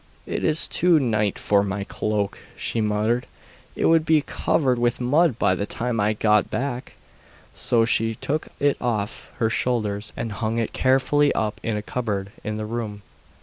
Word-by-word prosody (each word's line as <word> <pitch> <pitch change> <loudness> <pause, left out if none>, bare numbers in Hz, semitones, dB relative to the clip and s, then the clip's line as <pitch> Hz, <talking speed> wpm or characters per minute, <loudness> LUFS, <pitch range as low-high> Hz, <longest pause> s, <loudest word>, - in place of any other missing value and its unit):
'It - - -3
is 155 +1 +2
no 175 -2 +6
night 110 -7 +1
for 100 -1 +3
my 100 0 -2
cloak,' 105 0 -2 0.2
she 115 - -1
muttered; 110 +3 0 0.5
'it - - 0
would 165 -1 +5
be 155 -2 +3
covered 130 -5 +1
with 120 0 +1
mud 140 +2 +3
by 95 -5 +3
the 100 +3 -2
time 120 -1 -2
I 105 +1 +2
got 105 0 +2
back.' 130 -1 -3 0.6
So 115 -1 +2
she 115 -1 +1
took 150 +7 -2
it 145 0 +1
off 110 -4 -2
her 115 -1 +1
shoulders 110 -4 -1
and 115 - -3
hung 110 +2 -2
it 115 -2 -1
carefully 135 +3 +3
up 105 -1 -1
in 115 -2 -1
a 105 - -4
cupboard 105 -5 -3
in 105 0 -3
the 110 - -3
room. 110 -2 -5
115 Hz, 175 wpm, -24 LUFS, 105-125 Hz, 0.6 s, no